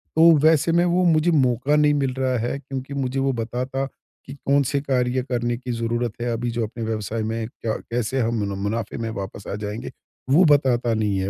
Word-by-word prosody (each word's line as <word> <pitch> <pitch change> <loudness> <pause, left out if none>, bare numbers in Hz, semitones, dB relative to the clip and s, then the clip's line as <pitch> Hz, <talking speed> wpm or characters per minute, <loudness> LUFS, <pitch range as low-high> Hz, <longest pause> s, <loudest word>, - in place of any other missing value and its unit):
तो 165 +1 +7
वैसे 160 +1 +4
मैं 170 +1 +3
वो 180 +1 +2
मुझे 165 0 +3
मौका 135 -1 +2
नहीं 150 0 +4
मिल 135 -3 0
रहा 130 -1 +1
है 135 - -2
क्योंकि 135 0 -6
मुझे 135 -1 -2
वो 135 0 +1
बताता 125 +3 -3 0.4
कि 135 - -8
कौन 140 +1 +4
से 140 - +1
कार्य 130 -2 0
करने 120 -1 0
की 125 0 -6
ज़रूरत 115 0 -1
है 120 0 -1
अभी 120 +1 -2
जो 115 0 -1
अपने 115 +2 -7
व्यवसाय 110 0 -3
में 110 0 -2
क्या 115 -1 -4 0.2
कैसे 120 +2 -1
हम 115 -1 0
मुन 100 -1 -4
मुनाफ़े 105 +2 -3
में 115 -1 -3
वापस 100 -2 -6
आ - - -2
जाएँगे 105 +1 -5 0.4
वो 155 +7 +6
बताता 130 -6 +3
नहीं 105 -3 0
है। 95 +1 -1
125 Hz, 215 wpm, -23 LUFS, 115-140 Hz, 0.4 s, तो